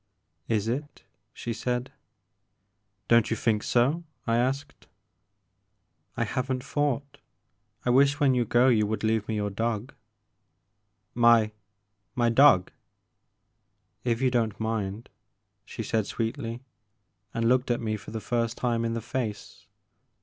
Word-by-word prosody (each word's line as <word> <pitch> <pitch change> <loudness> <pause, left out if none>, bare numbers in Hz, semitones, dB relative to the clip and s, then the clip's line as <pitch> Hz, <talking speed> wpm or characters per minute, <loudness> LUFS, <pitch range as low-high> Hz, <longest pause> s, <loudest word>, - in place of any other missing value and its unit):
'* 85 0 -48
"Is 105 +1 -3
it?*' 145 +5 -4 0.3
she 120 - -5
said. 125 +2 -2 1.2
Don't 115 -2 +4
you 115 - -1
think 110 -2 +1
so? 135 +11 +1 0.2
I 115 - +1
asked. 130 +4 -2 1.3
I - - +1
have 130 +1 -2
n't 130 -1 -2
thought; 140 -1 -2 0.7
I 125 - +3
wish 140 +3 +4
when 140 -3 +4
you 125 -1 +2
go 120 +3 +3
you 110 -5 +3
would 110 +1 -3
leave 110 -1 +1
me 110 - -2
your 105 -1 -1
dog.*' 115 +4 -2 1.2
My— 115 -2 +5 0.6
mydog?" 120 -4 +5 1.3
If 120 +1 0
you 130 - +3
don't 115 -4 0
mind," 110 -1 -3 0.6
she 115 - -6
said 110 -1 -1
sweetly, 115 0 -3 0.7
and 115 0 0
looked 125 +1 +2
at 120 - +1
me 110 -2 -2
for 105 - -9
the 110 +1 -4
first 115 +1 -1
time 120 -2 0
in 115 0 -1
the 115 - -3
face. 110 -4 -5
115 Hz, 135 wpm, -27 LUFS, 110-125 Hz, 1.3 s, My